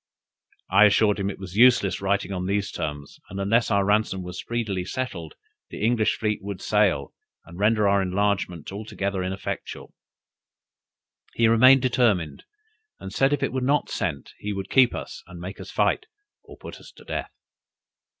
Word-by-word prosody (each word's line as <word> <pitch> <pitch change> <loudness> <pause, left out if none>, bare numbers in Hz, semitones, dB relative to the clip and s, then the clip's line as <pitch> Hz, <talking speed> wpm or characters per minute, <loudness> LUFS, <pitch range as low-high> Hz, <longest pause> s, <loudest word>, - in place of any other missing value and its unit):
I 100 +3 +7
assured 105 0 +3
him 100 0 -1
it 100 - -6
was 95 -1 -9
useless 115 -5 +4
writing 100 0 0
on 90 -1 -3
these 100 0 -1
terms, 75 -2 -6
and 95 - -6
unless 115 +4 +2
our 100 -1 +2
ransom 105 -2 +1
was 90 0 -7
speedily 110 -6 -3
settled, 90 -6 -5 0.3
the 105 - -3
English 115 -2 +2
fleet 105 -1 -1
would 100 -1 -6
sail, 100 -10 +1 0.3
and 85 +2 -12
render 105 0 +3
our 100 0 +3
enlargement 95 -3 -1
altogether 100 -1 -4
ineffectual. 95 +1 -5 1.4
He 115 - +3
remained 130 +4 +6
determined, 105 - +1 0.5
and 95 - -8
said 135 +1 +2
if 145 - 0
it - - -1
were 130 - -1
not 140 +3 +1
sent, 70 -6 -3
he 105 0 -4
would 95 -1 -6
keep 130 -2 +5
us, - - -7
and 90 - -11
make 95 +3 -8
us - - -9
fight, 435 - 0 0.4
or - - -14
put - - -10
us - - -14
to - - -16
death. - - -4
100 Hz, 170 wpm, -24 LUFS, 95-110 Hz, 1.4 s, I